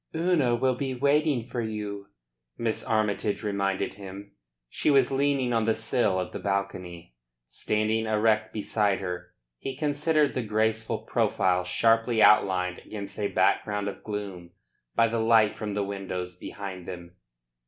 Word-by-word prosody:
"Una 160 Hz, -8 st, +2 dB
will 130 Hz, +2 st, +2 dB
be 130 Hz, +1 st, -3 dB
waiting 140 Hz, -1 st, +2 dB
for 120 Hz, +1 st, -4 dB
you," 105 Hz, -2 st, -5 dB, 0.5 s
Miss 115 Hz, -2 st, -1 dB
Armytage 105 Hz, -1 st, 0 dB
reminded 100 Hz, -2 st, -1 dB
him. 100 Hz, 0 st, -10 dB, 0.4 s
She -, -, -1 dB
was 135 Hz, -3 st, +4 dB
leaning 135 Hz, -2 st, +1 dB
on 115 Hz, -1 st, +2 dB
the 110 Hz, 0 st, +2 dB
sill 110 Hz, -4 st, +1 dB
of 90 Hz, -, -3 dB
the -, -, -5 dB
balcony. 90 Hz, -6 st, -3 dB, 0.3 s
Standing 110 Hz, -, -1 dB
erect 110 Hz, 0 st, +2 dB
beside 105 Hz, -2 st, 0 dB
her, 90 Hz, -1 st, -6 dB, 0.2 s
he 135 Hz, -, -5 dB
considered 150 Hz, 0 st, +2 dB
the 130 Hz, -, -1 dB
graceful 110 Hz, 0 st, -1 dB
profile 90 Hz, -1 st, +1 dB
sharply 115 Hz, +5 st, +2 dB
outlined 90 Hz, -4 st, +4 dB
against 100 Hz, -1 st, -8 dB
a 105 Hz, -, +1 dB
background 105 Hz, 0 st, +1 dB
of 100 Hz, -, -6 dB
gloom 100 Hz, -5 st, -6 dB, 0.4 s
by 115 Hz, -, +5 dB
the 115 Hz, 0 st, -1 dB
light 110 Hz, -1 st, +4 dB
from 105 Hz, -2 st, -4 dB
the 105 Hz, -, 0 dB
windows 95 Hz, -2 st, -5 dB
behind 95 Hz, -3 st, -7 dB
them. 90 Hz, 0 st, -9 dB
105 Hz, 145 wpm, -27 LUFS, 100-115 Hz, 0.5 s, by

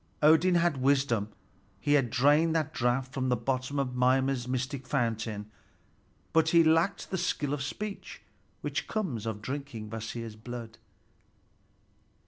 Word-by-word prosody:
Odin 160 Hz, +4 st, +6 dB
had 170 Hz, -4 st, +2 dB
wisdom, 130 Hz, -5 st, +2 dB, 0.5 s
he 145 Hz, +8 st, +1 dB
had 135 Hz, -5 st, +3 dB
drained 145 Hz, +7 st, +3 dB
that 155 Hz, -3 st, 0 dB
draught 125 Hz, +2 st, 0 dB
from 130 Hz, -1 st, -1 dB
the 125 Hz, -, +3 dB
bottom 130 Hz, +3 st, -2 dB
of 130 Hz, -2 st, -1 dB
Mimer's 130 Hz, 0 st, +2 dB
mystic 130 Hz, +1 st, -3 dB
fountain; 110 Hz, -5 st, -2 dB, 0.8 s
but 160 Hz, 0 st, +4 dB
he 170 Hz, 0 st, +6 dB
lacked 165 Hz, +4 st, +2 dB
the 190 Hz, -, -1 dB
skill 145 Hz, -5 st, -1 dB
of 145 Hz, -, -2 dB
speech 200 Hz, +9 st, -6 dB, 0.4 s
which -, -, -3 dB
comes 145 Hz, -, -2 dB
of 105 Hz, -1 st, -4 dB
drinking 130 Hz, -5 st, -5 dB
Kvasir's 115 Hz, 0 st, -5 dB
blood. 115 Hz, 0 st, -8 dB
130 Hz, 135 wpm, -29 LUFS, 120-150 Hz, 0.8 s, Odin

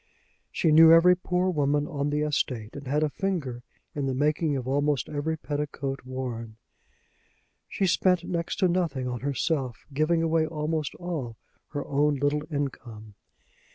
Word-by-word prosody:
She 160 Hz, -, +1 dB
knew 160 Hz, +1 st, +8 dB
every 170 Hz, +2 st, +7 dB
poor 180 Hz, +1 st, 0 dB
woman 145 Hz, -2 st, +1 dB
on 145 Hz, -2 st, -2 dB
the 150 Hz, 0 st, 0 dB
estate, 125 Hz, -7 st, -2 dB
and 140 Hz, -1 st, -8 dB
had 150 Hz, +3 st, +1 dB
a 155 Hz, -, +1 dB
finger 155 Hz, -12 st, -3 dB, 0.3 s
in 140 Hz, -2 st, -2 dB
the 130 Hz, -, -1 dB
making 150 Hz, +1 st, +1 dB
of 125 Hz, -1 st, -5 dB
almost 145 Hz, -1 st, +1 dB
every 155 Hz, +2 st, -2 dB
petticoat 145 Hz, -2 st, -3 dB
worn. 120 Hz, -4 st, -5 dB, 1.1 s
She 195 Hz, -, 0 dB
spent 180 Hz, -1 st, +2 dB
next 170 Hz, -1 st, -2 dB
to 185 Hz, -, +5 dB
nothing 170 Hz, -8 st, -1 dB
on 125 Hz, -1 st, -3 dB
herself, 135 Hz, -1 st, -2 dB
giving 160 Hz, +3 st, +2 dB
away 160 Hz, -1 st, +2 dB
almost 155 Hz, -1 st, -2 dB
all 155 Hz, -11 st, -5 dB, 0.3 s
her 145 Hz, -1 st, -5 dB
own 145 Hz, +1 st, +2 dB
little 145 Hz, +2 st, 0 dB
income. 120 Hz, -7 st, -5 dB
145 Hz, 155 wpm, -27 LUFS, 135-165 Hz, 1.1 s, knew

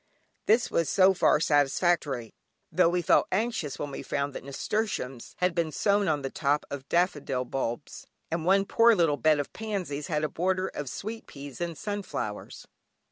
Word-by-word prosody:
This 230 Hz, +4 st, +3 dB
was 165 Hz, -, +1 dB
so 190 Hz, 0 st, +5 dB
far 185 Hz, -, +3 dB
satisfactory, 145 Hz, -4 st, +1 dB, 0.4 s
tho' 165 Hz, -, +4 dB
we 175 Hz, 0 st, 0 dB
felt -, -, +4 dB
anxious 210 Hz, -, -1 dB
when 145 Hz, -, -4 dB
we -, -, -6 dB
found 140 Hz, 0 st, -2 dB
that -, -, -7 dB
nasturtiums 140 Hz, -, -3 dB
had 180 Hz, -1 st, +1 dB
been 165 Hz, -2 st, 0 dB
sown 200 Hz, +6 st, +2 dB
on 150 Hz, -3 st, 0 dB
the 135 Hz, -, -3 dB
top 145 Hz, 0 st, 0 dB
of 140 Hz, -1 st, -6 dB
daffodil 145 Hz, -7 st, 0 dB
bulbs, 125 Hz, 0 st, -4 dB, 0.2 s
and 165 Hz, 0 st, -1 dB
one 195 Hz, +3 st, +3 dB
poor 230 Hz, +2 st, +5 dB
little 165 Hz, -6 st, +2 dB
bed 155 Hz, +3 st, +3 dB
of 145 Hz, -, -4 dB
pansies 185 Hz, -10 st, -4 dB
had 150 Hz, -2 st, -1 dB
a -, -, +2 dB
border 185 Hz, +4 st, -1 dB
of 145 Hz, -3 st, -5 dB
sweet 220 Hz, -, -6 dB
peas 140 Hz, +1 st, -9 dB
and 170 Hz, -2 st, -3 dB
sunflowers. 185 Hz, -, -5 dB
160 Hz, 175 wpm, -28 LUFS, 140-190 Hz, 0.4 s, so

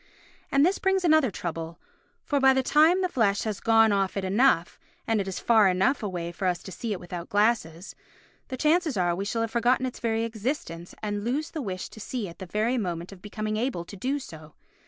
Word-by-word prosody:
And 275 Hz, +2 st, +4 dB
this 370 Hz, +3 st, +1 dB
brings 385 Hz, -3 st, +1 dB
another 315 Hz, -5 st, +4 dB
trouble, 165 Hz, -3 st, -5 dB, 0.5 s
for 285 Hz, -, +1 dB
by 265 Hz, 0 st, +6 dB
the 265 Hz, -, +2 dB
time 315 Hz, +7 st, +4 dB
the -, -, +2 dB
flesh 220 Hz, -, +1 dB
has 215 Hz, -3 st, -3 dB
gone 225 Hz, -1 st, +4 dB
off 195 Hz, -1 st, 0 dB
it 195 Hz, -, -2 dB
enough, 195 Hz, -3 st, +2 dB, 0.3 s
and 225 Hz, -2 st, +1 dB
it 195 Hz, -, -5 dB
is 190 Hz, -, -4 dB
far 220 Hz, -4 st, +4 dB
enough 190 Hz, +10 st, +2 dB
away 175 Hz, -5 st, -4 dB
for 185 Hz, +2 st, -3 dB
us 175 Hz, -2 st, -1 dB
to 190 Hz, -, -9 dB
see 220 Hz, +5 st, -5 dB
it 195 Hz, -, -2 dB
without 175 Hz, -1 st, -7 dB
glasses, 205 Hz, -5 st, 0 dB, 0.5 s
the 260 Hz, -, -5 dB
chances 310 Hz, -, +2 dB
are 175 Hz, -2 st, +1 dB
we 195 Hz, +3 st, -3 dB
shall 230 Hz, +2 st, -1 dB
have 225 Hz, -1 st, -2 dB
forgotten 245 Hz, +2 st, +2 dB
its 255 Hz, -, -5 dB
very 225 Hz, -1 st, 0 dB
existence 220 Hz, -, -4 dB
and 205 Hz, -1 st, -2 dB
lose 280 Hz, +7 st, -2 dB
the 315 Hz, -, -4 dB
wish 185 Hz, -6 st, -4 dB
to -, -, -13 dB
see 220 Hz, 0 st, -4 dB
at 170 Hz, -, -12 dB
the 190 Hz, -, -7 dB
very 220 Hz, +7 st, 0 dB
moment 175 Hz, -3 st, -4 dB
of 190 Hz, -2 st, -13 dB
becoming 215 Hz, +1 st, -4 dB
able 225 Hz, -7 st, -2 dB
to 200 Hz, -, -10 dB
do 260 Hz, +9 st, -1 dB
so. 160 Hz, -, -11 dB
215 Hz, 220 wpm, -26 LUFS, 185-260 Hz, 0.5 s, by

